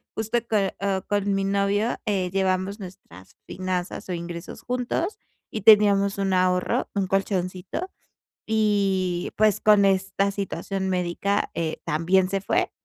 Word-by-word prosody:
justo 220 +2 -1
con 200 -4 +1
o 195 -1 0
con 205 -1 0
mi 195 0 0
novio, 200 +3 +1
eh, 190 -4 0
llevamos 190 +1 0
nuestras 95 - -12
finanzas 185 0 -4
o - - -1
ingresos 170 0 -7
juntos, 250 - -2 0.3
y 215 - -5
teníamos 200 -2 +5
un 195 -1 0
ahorro, 180 0 +1
un 195 -2 0
colchoncito, 190 - -2 0.6
y 195 -5 +1
pues 215 0 +3
con 210 -2 +5
esta 195 +1 +1
situación 195 -1 -3
médica, 185 +2 -1
eh, 160 -1 -2
también 180 +4 +2
se 195 0 -1
fue, - - 0
195 Hz, 135 wpm, -24 LUFS, 185-205 Hz, 0.6 s, teníamos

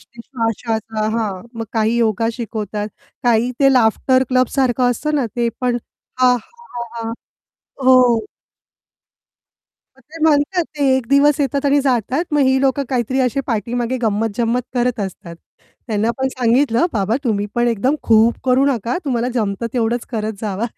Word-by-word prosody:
श्व 235 - -15 0.4
श्वासाचा. 220 -2 -2
हां, 200 -5 -2 0.2
मग 225 - -2
काही 225 +1 +1
योगा 225 -1 +1
शिकवतात, 215 -3 -4 0.4
काही 240 +1 +3
ते 275 -1 +5
लाफ्टर 255 +2 +3
क्लबसारखं 255 -1 +2
असतं 300 +5 -2
ना 260 -4 0
ते 235 -1 +1
पण 250 -1 +1 0.5
हां, 250 -1 +5
हां, 245 - -9
हां, 230 -1 -5
हां. 225 - -3 0.7
हो. 250 -4 +5 1.7
मग - - -21
ते 325 0 -10
म्हणतात 320 +3 +3
ते 285 - 0
एक 250 -3 -3
दिवस 285 +1 +4
येतात 280 0 -1
आणि 285 0 +4
जातात. 265 - 0
मग 295 - +2
ही 265 0 +3
लोक 270 -1 +1
काहीतरी 255 +1 -1
अशी 255 +2 +1
पाठीमागे 240 +3 -1
गंमत-जंमत 225 +3 0
करत 245 -2 0
असतात. 180 -3 -6 0.5
त्यांना 220 0 0
पण 265 - +1
सांगितलं, 255 +4 +2
"बाबा, 215 +2 0
तुम्ही 205 -3 0
पण 240 0 +2
एकदम 245 +6 +1
खूप 225 +1 +4
करू 255 +1 +3
नका. 240 - 0
तुम्हाला 245 -3 0
जमतं 215 0 -1
तेवढंच 235 -1 0
करत 220 -2 -2
जावा, 210 0 -2
240 Hz, 155 wpm, -19 LUFS, 225-260 Hz, 1.7 s, ते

